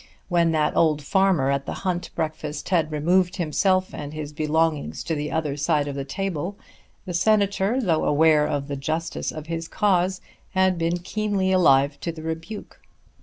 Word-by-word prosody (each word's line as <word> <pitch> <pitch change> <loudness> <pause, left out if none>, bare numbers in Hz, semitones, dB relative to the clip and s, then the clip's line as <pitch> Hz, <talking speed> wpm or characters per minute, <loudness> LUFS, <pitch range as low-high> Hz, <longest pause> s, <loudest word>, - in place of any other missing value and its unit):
When 170 -2 +3
that 155 -1 +1
old 155 -3 +3
farmer 185 -6 +2
at 140 0 -2
the - - -3
hunt 180 -1 -1
breakfast 155 -1 -4
had 165 -4 +1
removed 175 +4 +2
himself 185 +2 +1
and 145 +1 -6
his 150 -1 -6
belongings 155 0 0
to 165 - -2
the 150 -1 -3
other 155 -3 -1
side 145 0 +1
of 140 - -3
the 140 0 -3
table 185 +3 -3 0.5
the 180 - -5
Senator, 200 +4 +2
though 175 -10 +1
aware 150 0 +4
of 140 -1 -2
the 140 - -3
justice 160 +4 -3
of 155 -1 -7
his 165 0 -4
cause, 185 -1 +1 0.4
had 190 -2 +3
been 165 +1 0
keenly 195 +1 -1
alive 140 -6 +4
to 165 - -3
the 160 -1 -10
rebuke. 165 +6 -6
165 Hz, 170 wpm, -24 LUFS, 150-185 Hz, 0.5 s, aware